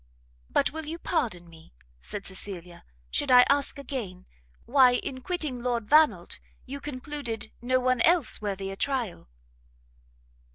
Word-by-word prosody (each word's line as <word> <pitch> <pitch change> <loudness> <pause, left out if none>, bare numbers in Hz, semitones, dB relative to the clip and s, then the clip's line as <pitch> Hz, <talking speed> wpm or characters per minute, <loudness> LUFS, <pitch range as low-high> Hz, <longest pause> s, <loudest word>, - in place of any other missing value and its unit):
"But - - +2
will 320 0 -6
you 325 +2 -4
pardon 235 - -2
me," 160 - -17 0.3
said 205 -1 -6
Cecilia, 180 -3 -6 0.3
"should - - -1
I 250 -1 +8
ask 285 +1 +1
again, 235 -10 -6 0.4
why 255 0 +6
in 260 +1 -4
quitting 300 -6 -2
Lord 240 -3 -1
Vannelt, 310 +3 +3 0.3
you 280 +2 -6
concluded 270 -5 -5
no 255 +1 +2
one 255 -1 +1
else 335 -7 +3
worthy 195 -2 -3
a - - -6
trial?" 235 - -2
250 Hz, 135 wpm, -27 LUFS, 200-280 Hz, 0.4 s, I